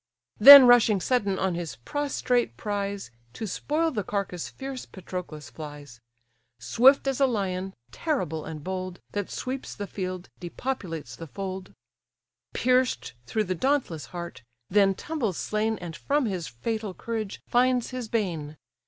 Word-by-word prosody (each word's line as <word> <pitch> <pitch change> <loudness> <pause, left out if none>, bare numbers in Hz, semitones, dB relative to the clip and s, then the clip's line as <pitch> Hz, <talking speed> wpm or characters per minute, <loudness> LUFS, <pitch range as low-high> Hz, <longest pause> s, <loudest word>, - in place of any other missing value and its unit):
Then 280 -1 +12
rushing 235 -4 +6
sudden 200 -2 0
on 190 -1 0
his 170 -8 -4
prostrate 250 - -1
prize, 200 - -3 0.2
To 220 - -5
spoil 310 - -1
the 215 -7 -2
carcase 190 -3 -3
fierce 265 -1 -7
Patroclus 170 - -7
flies: 145 -4 -10 0.6
Swift 255 - +4
as 270 -1 0
a 275 - +5
lion, 190 -5 -2 0.2
terrible 180 - -2
and 155 -2 -7
bold, 185 0 -4
That 205 -2 -3
sweeps 260 +1 -5
the 205 - -4
field, 185 -2 -5
depopulates 175 - -5
the 165 - -9
fold; 190 +2 -6 0.8
Pierced 250 - +1
through 215 - 0
the 185 -2 -2
dauntless 240 - -1
heart, 170 -7 -7 0.3
then 195 -1 +4
tumbles 245 - -3
slain, 215 +1 -1
And 175 -3 -7
from 285 - 0
his 185 -6 -3
fatal 215 - -4
courage 220 -3 -4
finds 250 0 +2
his 255 -2 -4
bane. 165 -10 -2
200 Hz, 140 wpm, -26 LUFS, 175-245 Hz, 0.8 s, Then